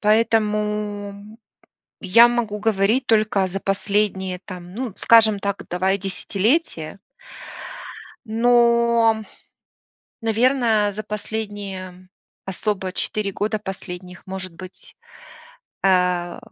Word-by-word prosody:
Поэтому 210 -1 0 0.6
я 230 +5 +7
могу 230 -4 -1
говорить 220 +3 +2
только 215 -3 +2
за 195 +2 -4
последние, 195 -2 -1
там, 180 -1 -9
ну, 250 +1 -4
скажем 220 -3 +5
так, 200 0 -3
давай 190 +2 +1
десятилетия. 195 - -1 1.3
Но 235 -1 +3 1.0
наверное, 225 -2 +2
за 215 +2 -5
последние 200 -4 -6 0.4
особо 190 -1 -2
4 210 0 -2
года 215 +3 -1
последних, 185 -2 -8
может 185 -2 -6
быть, 185 +2 -12 0.9
э, 180 -1 +2
205 Hz, 85 wpm, -22 LUFS, 190-220 Hz, 1.3 s, я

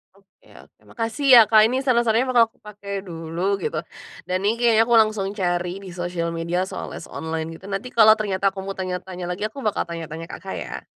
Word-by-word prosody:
Oke 195 0 -28 0.2
oke, - - -27
makasih 230 +4 -3
ya 235 - +11
Kak 215 -1 +7
ini 250 +3 -1
saran-sarannya 235 -2 +2
bakal 235 -2 +6
aku - - -36
pake 205 -1 -11 0.2
dulu, 170 +4 -2
gitu. 455 - -3 0.5
Dan 185 0 0
ini 220 +2 +2
kayaknya 230 -2 +4
aku 235 - +4
langsung 215 -3 -1
cari 175 -2 -1
di 190 - -9
sosial 175 -1 -3
media 170 +2 -1
soal 190 - -6
les - - -8
online 160 0 -4
gitu, 165 - -13
nanti 200 +5 -4
kalo 220 -2 +7
ternyata 200 -3 -2
aku 195 - -7
mau 195 - -4
tanya-tanya 185 -1 -5
lagi 180 +4 -4
aku 275 - -10
bakal 210 - 0
tanya-tanya 165 -1 -7
Kakak 190 +2 -7
ya. - - -7
195 Hz, 200 wpm, -23 LUFS, 175-220 Hz, 0.5 s, ya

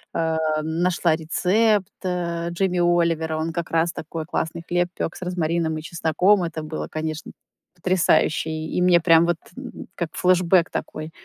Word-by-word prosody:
э, 160 -1 0 0.3
нашла 170 +1 +1
рецепт, 190 +5 +1 0.2
э, 170 -2 -2
Джимми 180 +1 0
Оливера. 170 -2 +1
Он 160 +1 -2
как 170 0 -4
раз 165 +1 +2
такой 160 0 -6
классный 165 +1 -3
хлеб 175 0 +1
пёк 165 - -2
с 185 - -7
розмарином 165 -2 -1
и - - -5
чесноком. 170 +5 +2
Это 165 -2 -4
было, 155 0 -5
конечно, 155 0 -4 0.4
потрясающе. 175 -3 +2
И 155 +2 -3
мне 180 -1 +5
прям 165 0 +5
вот 170 -1 0 0.6
как 170 -3 -3
флэшбек 180 -1 +4
такой. 155 +1 -5
170 Hz, 150 wpm, -23 LUFS, 160-180 Hz, 0.6 s, мне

